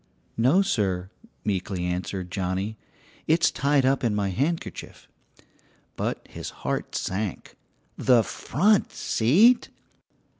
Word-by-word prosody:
"No, 135 +12 +4
sir," 95 - -1 0.3
meekly 95 -3 -2
answered 90 0 -3
Johnnie, 95 +3 -2 0.5
"it's 165 +1 +4
tied 140 +1 +2
up 135 0 +2
in 115 -3 +1
my 100 -1 0
handkerchief." 155 - -3 0.9
But - - -3
his - - -7 0.2
heart - - -2
sank 95 0 -3 0.4
the 125 -3 +5
front 200 - +1
seat! 200 - +3
110 Hz, 105 wpm, -25 LUFS, 95-145 Hz, 0.9 s, the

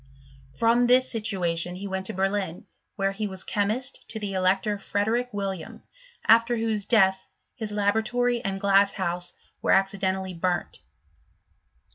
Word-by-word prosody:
From 235 - +3
this 255 +1 +4
situation 180 -6 -1
he 200 +2 -6
went 190 0 -3
to - - -3
Berlin, 195 -2 -1 0.3
where 195 -1 0
he 210 +2 -3
was 190 -1 -5
chemist 220 +6 -2
to 225 - -5
the 205 -2 -4
elector 190 +2 +1
Frederick 220 +5 -1
William; 195 -5 -5 0.4
after 230 +2 +5
whose 220 -3 0
death, 190 -4 +3 0.2
his 220 -4 -4
laboratory 225 +4 +1
and 195 -2 -2
glass 200 0 +4
house 175 -2 -3 0.3
were - - -2
accidentally 190 -1 +1
burnt. 175 0 -2
200 Hz, 135 wpm, -26 LUFS, 190-220 Hz, 0.4 s, after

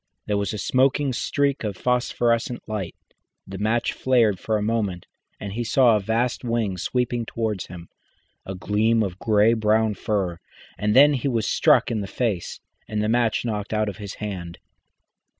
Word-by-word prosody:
There 105 - -1
was 100 -1 -1
a 105 - -4
smoking 130 +5 +1
streak 140 +2 0
of 105 -4 -3
phosphorescent 120 -1 0
light, 105 -6 -4 0.5
the 95 0 -8
match 115 +3 0
flared 115 -7 +2
for 110 +2 -1
a - - -3
moment, 105 -5 -1 0.3
and 100 -1 -6
he 120 +3 -2
saw 120 -1 +4
a - - +2
vast 115 +6 -1
wing 115 -6 -1
sweeping 120 +3 -1
towards 110 -4 -3
him, 85 -1 -10 0.6
a 95 - -6
gleam 110 +4 +1
of 95 -2 -5
grey 110 0 +3
brown 110 -1 +2
fur, 95 -4 -2 0.4
and 105 0 0
then 145 +3 +7
he 140 0 -1
was 115 -5 0
struck - - +3
in 110 -3 -1
the 100 - -5
face 105 -5 -2 0.3
and 105 -1 -2
the 105 - 0
match 120 0 +1
knocked 105 -2 -3
out 110 -1 +1
of 100 - -8
his 100 -2 -7
hand. 90 -5 -6
110 Hz, 175 wpm, -23 LUFS, 100-120 Hz, 0.6 s, then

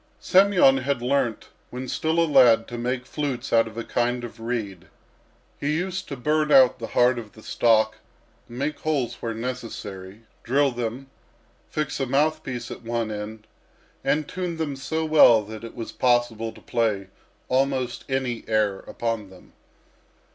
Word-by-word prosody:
Semyon 185 -8 +5
had 130 -2 -2
learnt 125 -3 0 0.2
when 125 +1 -6
still 160 +5 0
a 165 - +4
lad 115 -7 +5
to 120 - -6
make 125 +1 -2
flutes 140 -3 -3
out 115 -1 +5
of 110 0 -11
a 115 - -3
kind 120 +1 -1
of 120 -1 -8
reed. 115 -6 -4 0.7
He 150 +2 0
used 185 +2 -3
to 140 - -6
burn 150 +3 +1
out 130 -2 +6
the 115 - -5
heart 125 0 +4
of 110 -3 -10
the 110 - -15
stalk, 110 -2 +2 0.5
make 140 +5 -3
holes 135 -7 -1
where 115 -1 -3
necessary, 115 -5 -6 0.2
drill 140 +3 +2
them, 120 +3 -5 0.6
fix 155 -2 -3
a 135 - -1
mouthpiece 135 -3 -1
at - - -7
one 115 -1 -2
end, 105 +1 -6 0.6
and 150 0 +1
tune 180 -2 -4
them 155 -3 -2
so 160 +4 -2
well 135 -8 +6
that 110 +2 -9
it 115 - -9
was 115 -2 -6
possible 120 -2 +1
to - - -16
play 105 -5 -1 0.4
almost 130 -1 0
any 130 -3 -1
air 105 -3 +1 0.2
on 115 -4 -1
them. 95 -1 -17
125 Hz, 160 wpm, -24 LUFS, 115-140 Hz, 0.7 s, out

